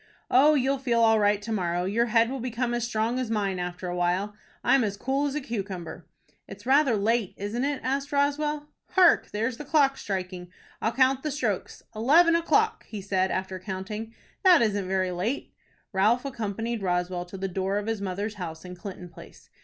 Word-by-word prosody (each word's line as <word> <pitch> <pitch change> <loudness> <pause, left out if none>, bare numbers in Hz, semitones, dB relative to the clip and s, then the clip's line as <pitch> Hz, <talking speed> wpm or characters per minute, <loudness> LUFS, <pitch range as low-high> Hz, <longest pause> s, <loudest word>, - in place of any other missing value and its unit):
"Oh, 295 +4 +6
you'll 270 0 +1
feel 240 -3 +1
all 225 -1 +5
right 205 0 +3
to 225 - -5
morrow. 175 -4 -1
Your 230 +5 +1
head 230 +1 +3
will 270 - -3
become 240 0 -2
as 240 -1 -1
strong 235 +1 -1
as 255 -3 -2
mine 200 -4 -1
after 180 +1 -4
a 175 - -3
while. 180 +4 0 0.3
I'm 265 0 +4
as 200 -2 -2
cool 270 +5 0
as 280 - -4
a 300 - -1
cucumber." 195 - -6 0.4
"It's - - -11
rather 270 -2 +4
late, 215 0 0
isn't 210 +5 -3
it?" 280 0 -1
asked 275 +2 -1
Roswell. 295 +1 0 0.3
"Hark, 365 -3 +5
there's 230 +3 -2
the - - -6
clock 280 -2 +3
striking. 185 -2 -4 0.3
I'll 220 - +1
count 260 +2 +3
the 305 - -2
strokes. 240 -9 -3
Eleven 325 +10 +5
o'clock!" 430 +6 +2
he 215 - -6
said, 190 -1 0
after 190 0 -3
counting. 205 +4 -5 0.3
"That 360 -9 +7
isn't 205 -3 0
very 185 -1 0
late." 195 +10 -3 0.4
Ralph 220 +7 +2
accompanied 230 -2 -3
Roswell 180 -1 -1
to 180 +2 -9
the 195 +1 -2
door 190 +2 -1
of 205 - -2
his 225 -2 -2
mother's 200 +2 -3
house 160 0 -6
in 180 - -7
Clinton 180 -1 -8
Place. 170 - -15
220 Hz, 195 wpm, -26 LUFS, 190-265 Hz, 0.4 s, That